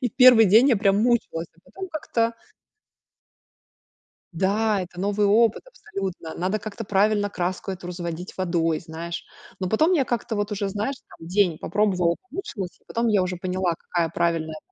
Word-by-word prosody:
И 250 - 0
в - - -40
1 250 -4 +8
день 220 +7 +6
я 245 - +4
прям 200 0 +2
мучилась, 225 -8 +1
а - - -27
потом 380 0 -8
как-то 235 -8 -1 2.0
Да, 200 +4 +1
это 180 0 -9
новый 205 +1 +1
опыт 225 +2 +3
абсолютно, 190 - -6
надо 190 +4 -1
как-то 215 +1 -7
правильно 205 +1 +2
краску 185 +1 -3
эту 185 -1 -6
разводить 175 0 -6
водой, 170 -3 0
знаешь, 170 +1 -6 0.3
но 185 - -2
потом 310 - +3
я 295 -7 +3
как-то 235 -2 -2
вот 205 0 -2
уже, 200 -1 -1
знаешь, 215 +7 -2 0.2
там, 165 - -11
день 180 -3 +2
попробовала, 180 -3 +1
помучилась, 235 - -6
и - - -36
потом 230 0 -1
я 205 -4 +3
уже 180 0 -2
поняла, 180 0 -1
какая 170 -2 -1
правильная 165 -2 -1
195 Hz, 165 wpm, -24 LUFS, 175-220 Hz, 2.0 s, 1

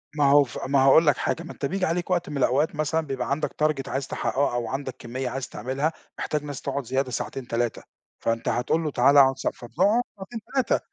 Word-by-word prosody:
ما 145 -2 +3
هو 145 0 +7
ف 120 - -8
ما 140 0 +3
هاقول 155 +4 +6
لك 145 - +4
حاجة 170 - -1
ما 170 - -8
أنت 140 - -5
بييجي 185 +5 0
عليك 175 +2 -1
وقت 175 -3 0
من 145 - -4
الأوقات 140 +4 +2
مثلًا 155 +2 0
بيبقى 130 -2 -3
عندك 150 +2 0
target 150 -4 0
عايز 135 0 -2
تحققه 140 -2 0
أو 120 -1 -1
عندك 135 -1 -4
كميّة 125 +2 -4
عايز 130 +1 -5
تعملها 135 +8 -2 0.3
محتاج 150 -1 -2
ناس 145 -3 -6
تقعد 140 0 -2
زيادة 130 +1 -1
ساعتين 125 +1 -4
3 120 0 -1 0.4
فأنت 115 0 -1
هتقُول 140 +7 0
له 150 - -2
تعالَ 135 +3 +4
اقعد 135 -1 +6
س - - -3
فبتقعد 195 - +1 0.2
ساعتين 210 +4 -7
3 265 -2 +2
140 Hz, 220 wpm, -25 LUFS, 130-155 Hz, 0.4 s, هو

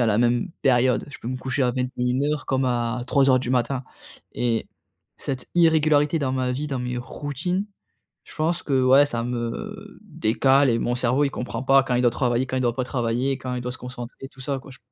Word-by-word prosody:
à 120 - +3
la 105 -1 +2
même 120 +9 +2
période. 125 -1 +3
Je - - -9
peux - - -10
me 130 - -2
coucher 130 +1 -2
à 125 - +2
21:00 130 +3 -1
comme 130 -1 +1
à 120 0 -1
03:00 135 -2 +4
du 125 - -3
matin, 130 +1 0 0.5
et 115 -2 -1 0.5
cette 130 -2 -4
irrégularité 155 -2 +4
dans 130 -3 -1
ma 130 -1 0
vie, 145 +4 -3
dans 135 -2 -2
mes 125 0 -3
routines, 145 - -3 0.6
je - - -14
pense 170 +2 0
que, 135 -3 +1
ouais, 135 +3 +6
ça 115 -4 -2
me 190 - -5
décale 135 - +2
et 115 0 +1
mon 120 - 0
cerveau 125 +3 +2
il 140 - 0
comprend 125 +1 -4
pas 135 0 +5
quand 125 -2 -1
il 125 - +2
doit 120 - +6
travailler, 120 +1 0
quand 130 - -2
il - - 0
doit 120 -2 +1
pas 130 - -1
travailler, 125 +1 -1
quand 130 -1 -5
il 125 - -3
doit 125 0 -4
se - - -8
concentrer, 125 +1 -8
tout 135 - -14
ça 135 +1 -2
quoi. 135 - -13
J 130 - -13
130 Hz, 220 wpm, -24 LUFS, 125-140 Hz, 0.6 s, ouais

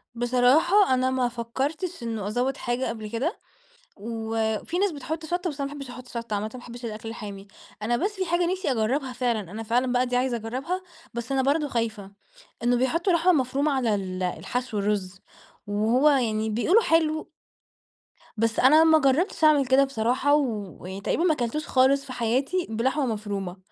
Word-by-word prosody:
بصراحة، 255 - +4
أنا 255 0 +2
ما 255 -1 +1
فكرتش 265 +7 -3
إنّه 225 -4 -3
أزود 250 +6 -1
حاجة 245 +2 -2
قبل 220 -2 -6
كده، 265 - -2 0.6
وفي 225 - -2
ناس 400 -1 +2
بتحط 315 +3 -5
شطة، 350 +2 -1
بس 290 -1 -9
أنا 275 0 -2
ما - - -7
باحبش 275 -3 -7
أحط 250 0 -10
شطة 230 -3 -5
عامةً، 210 +1 -2
ما - - -6
باحبش 245 0 -10
الأكل 220 0 -6
الحامي. 205 -3 -7 0.4
أنا 235 +3 +1
بس 390 - 0
في 380 -1 -2
حاجة 345 +1 +1
نفسي 375 -4 -2
أجربها 255 +4 0
فعلًا، 245 -3 0
أنا 220 +3 -5
فعلًا 245 +3 +1
بقى 250 0 +2
دي 245 0 -1
عايزة 250 -1 +1
أجربها، 260 - -4 0.3
بس 235 +3 -4
أنا 265 -1 +2
برضو 290 +2 +1
خايفة، 225 -5 -3 0.5
إنّه 245 +1 +3
بيحطوا 335 +9 +1
لحمة 340 +2 +4
مفرومة 280 0 +1
على 245 -6 +1
ال 185 -2 -3
الحشو، 225 +5 -3
الرز، 200 -2 -2 0.5
وهو 220 +8 +3
يعني 220 -5 +1
بيقولوا 340 - +3
حلو. 315 -3 +1 1.1
بس، 225 +1 0
أنا 305 +5 +7
ما 320 -1 +6
جرّبتش 305 +5 +1
أعمل 300 -3 +5
كده 260 +2 +5
بصراحة، 260 +2 +1
ويعني 205 -8 -3
تقريبًا 315 - 0
ما 345 -3 +4
كلتوش 255 +4 -3
خالص 270 +1 +3
في 255 - -7
حياتي 260 +10 0
بلحمة 260 +6 0
مفرومة، 205 -5 -4
250 Hz, 175 wpm, -25 LUFS, 225-290 Hz, 1.1 s, أنا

